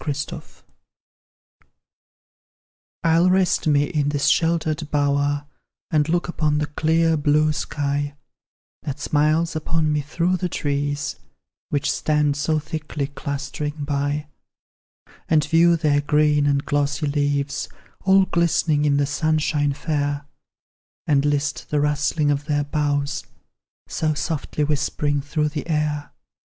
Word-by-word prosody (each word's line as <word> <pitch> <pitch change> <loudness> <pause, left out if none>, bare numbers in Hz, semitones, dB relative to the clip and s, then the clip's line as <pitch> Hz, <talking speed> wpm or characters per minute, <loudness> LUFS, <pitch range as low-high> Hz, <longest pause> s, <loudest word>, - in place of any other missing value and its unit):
THE 145 -2 -1 0.2
ARBOUR. - - -7 2.6
I'll 165 +2 +4
rest 185 -3 +2
me 145 -1 +4
in 145 -1 0
this 145 -1 0
sheltered 160 -2 +1
bower, 145 0 +1 0.5
And 150 0 +2
look 175 +1 +1
upon 155 -3 0
the 150 - 0
clear 160 +2 +2
blue 150 +1 +2
sky 145 -1 -2 0.7
That 140 -1 -5
smiles 155 +3 +1
upon 155 0 0
me 150 - +1
through 170 +5 0
the 180 0 -2
trees, 145 -1 -2 0.5
Which 145 -1 0
stand 150 -2 +1
so 155 +2 0
thick 155 0 -5 0.3
clustering 145 +1 -4
by; 145 +1 -1 1.0
And 155 -2 +4
view 165 +2 +4
their 150 -3 +2
green 150 0 +3
and 140 0 +1
glossy 145 0 0
leaves, 145 -1 -1 0.3
All 190 0 +5
glistening 165 -4 +1
in 140 -1 +3
the 145 - +2
sunshine 150 -1 +1
fair; 145 -1 -2 0.8
And 145 -2 +2
list 145 0 -1
the 150 - +1
rustling 150 +1 +1
of 145 0 -1
their 145 -1 0
boughs, 145 0 -1 0.6
So 155 -1 -1
softly 150 0 -2
whispering 145 0 0
through 150 +2 -1
the 150 +1 -5
air. 150 -2 -1
150 Hz, 125 wpm, -22 LUFS, 145-155 Hz, 2.6 s, All